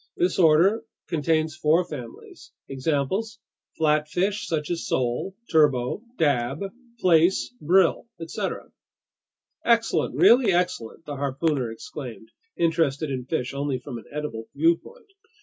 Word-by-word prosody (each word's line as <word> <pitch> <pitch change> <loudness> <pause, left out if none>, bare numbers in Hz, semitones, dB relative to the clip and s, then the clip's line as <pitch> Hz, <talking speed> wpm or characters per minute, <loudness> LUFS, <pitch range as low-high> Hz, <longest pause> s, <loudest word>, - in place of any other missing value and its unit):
This 180 +2 +1
order 175 +6 +5 0.3
contains 160 -1 0
four 165 +2 +2
families. 120 -7 -10 0.2
Examples: 150 +11 -1 0.4
flatfish 160 +6 +1
such 155 -1 -2
as 170 -1 -3
sole, 125 +10 -1 0.2
turbot, 145 -5 +3 0.2
dab, 135 -2 +1 0.4
plaice, 175 +5 +3
brill, 180 +6 +3
etc." 165 -1 -5 0.9
"Excellent, 230 -1 +2
really 235 -3 +6
excellent!" 175 -7 -2
the 145 -1 -6
harpooner 140 -1 -1
exclaimed, 120 -2 -9 0.3
interested 160 -3 +1
in 130 -2 -3
fish 130 -2 -2
only 140 -1 -1
from 125 -2 -7
an - - -15
edible 145 -7 -5
viewpoint. 170 - 0
155 Hz, 115 wpm, -25 LUFS, 135-175 Hz, 0.9 s, really